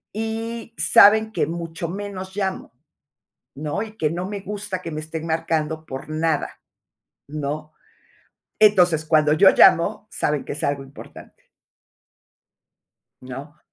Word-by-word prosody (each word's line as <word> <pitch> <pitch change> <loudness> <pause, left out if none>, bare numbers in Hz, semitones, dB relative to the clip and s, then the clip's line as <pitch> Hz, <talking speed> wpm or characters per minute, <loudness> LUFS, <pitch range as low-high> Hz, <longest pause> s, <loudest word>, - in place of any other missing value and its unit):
y 225 +1 -4
saben 220 0 +6
que - - 0
mucho 165 0 -5
menos 190 0 -6
llamo, 195 -2 -3 0.8
¿no?, 150 +8 -3
y 220 -1 -9
que 155 -7 0
no 175 +3 -3
me 205 -1 -5
gusta 200 -2 -5
que 165 - -6
me 155 -1 -4
estén 160 +1 -6
marcando 160 -1 -1
por 135 0 -7
nada, 155 0 -1 0.7
¿no? 150 +1 -5 0.9
Entonces, 180 -7 +4
cuando 155 -1 +3
yo 190 +5 +7
llamo 205 +5 +4
saben 150 -2 -1
que - - -5
es 150 - -4
algo 140 -1 -1
importante. 135 +1 -14 1.8
¿No? 135 +4 -9
165 Hz, 125 wpm, -22 LUFS, 155-205 Hz, 1.8 s, yo